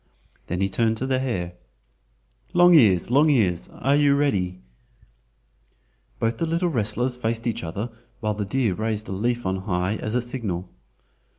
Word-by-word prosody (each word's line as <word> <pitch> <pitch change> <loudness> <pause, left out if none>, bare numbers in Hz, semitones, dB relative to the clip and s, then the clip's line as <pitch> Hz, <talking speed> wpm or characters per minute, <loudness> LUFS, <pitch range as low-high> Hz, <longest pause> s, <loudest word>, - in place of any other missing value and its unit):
Then 90 +2 -2
he 95 - +2
turned 110 +3 0
to 130 - -2
the 130 -1 +1
hare: 95 -10 -2 1.0
"Long 175 0 +6
ears! 110 - +5
Long 145 +4 +5
ears! 95 - +1
are 135 +3 +1
you 145 -1 +4
ready?" 95 -11 0 1.6
Both 115 +1 -1
the 165 - 0
little 170 +2 0
wrestlers 125 -1 -1
faced 115 -1 -2
each 115 -5 -2
other 100 +9 -4 0.3
while 110 -2 -1
the 105 0 -3
deer 115 0 0
raised 110 +2 -3
a - - -4
leaf 120 +4 -1
on 95 0 0
high 95 +1 -1
as 110 +3 -2
signal. 100 -8 -4
115 Hz, 160 wpm, -24 LUFS, 95-130 Hz, 1.6 s, Long